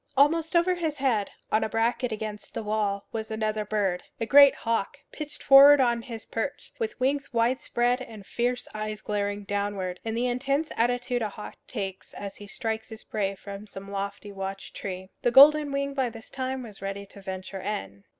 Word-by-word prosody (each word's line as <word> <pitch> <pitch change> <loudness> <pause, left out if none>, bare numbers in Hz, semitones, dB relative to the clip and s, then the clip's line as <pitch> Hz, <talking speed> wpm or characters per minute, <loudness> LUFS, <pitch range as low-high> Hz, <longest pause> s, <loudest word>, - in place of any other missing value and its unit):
Almost 320 +4 +3
over 340 +2 +4
his 325 -4 -2
head, 245 -7 +1 0.2
on 215 - +3
a - - -1
bracket 230 +2 0
against 215 -1 -6
the - - -3
wall, 210 -2 -1
was 220 -1 -4
another 215 -1 -1
bird, 205 -4 0 0.2
a 225 - 0
great 280 +3 +8
hawk, 225 -4 -1
pitched 300 -1 -7
forward 280 +1 +9
on 240 -2 +3
his 230 -2 -8
perch, 230 +5 -4
with 440 - -3
wings 275 +2 0
wide 235 +2 +2
spread 245 +1 +1
and 220 -5 -9
fierce 245 +3 -1
eyes 215 0 -4
glaring 205 -1 -2
downward, 200 -2 -2
in 225 0 -3
the 240 +2 0
intense 275 +5 0
attitude 245 +1 +1
a 215 - -1
hawk 210 - -8
takes 195 -5 -5
as 200 -1 -7
he 205 - -10
strikes 220 +1 -4
his 220 -1 -10
prey 195 -2 -2
from 200 +1 -9
some 195 0 -9
lofty 200 +1 -4
watch 195 0 -6
tree. 190 -1 -6
The - - +3
golden 290 +3 +8
wing 280 0 -1
by 265 -3 0
this 225 -1 -12
time 260 -1 -3
was 215 -4 -11
ready 195 0 -4
to 200 0 -14
venture 190 0 -6
in. 100 - -4
220 Hz, 190 wpm, -27 LUFS, 200-260 Hz, 0.2 s, forward